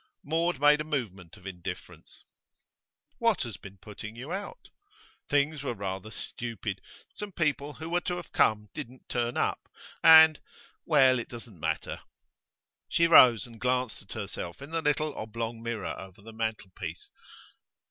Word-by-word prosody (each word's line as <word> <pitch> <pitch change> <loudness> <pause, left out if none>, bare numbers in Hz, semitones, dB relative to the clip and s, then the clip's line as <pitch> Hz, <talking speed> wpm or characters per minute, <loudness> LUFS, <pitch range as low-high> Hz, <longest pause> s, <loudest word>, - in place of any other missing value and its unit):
Maud 165 0 0
made 150 +1 +5
a - - -2
movement 110 - -4
of 90 - -18
indifference. 90 -3 -8 1.0
'What - - +2
has - - -6
been 95 +1 -12
putting 105 +3 -9
you 130 +7 -7
out?' 205 - -6 0.6
'Things 145 +1 +2
were 135 -4 -3
rather 95 +1 -4
stupid. 110 -2 -5 0.3
Some 210 -1 -6
people 150 -4 -1
who 160 - -8
were 175 +1 +1
to 180 - -2
have 175 -3 -8
come 105 -1 +2
didn't 130 -3 -9
turn 120 0 -1
up. - - -1 0.3
And 160 -1 +9 0.5
well, 130 -5 +5
it 120 - -6
doesn't 115 -6 -10
matter.' - - -2 0.9
She 170 - +3
rose 125 -9 +8
and 115 -2 -14
glanced 125 -1 0
at 100 - -10
herself 95 -5 -6
in 140 +3 -10
the 165 0 -1
little 150 0 +1
oblong 115 +1 -5
mirror 115 -4 -3
over 95 0 -11
the 115 +1 -11
mantelpiece. 95 -7 -5
120 Hz, 150 wpm, -29 LUFS, 105-150 Hz, 1.0 s, And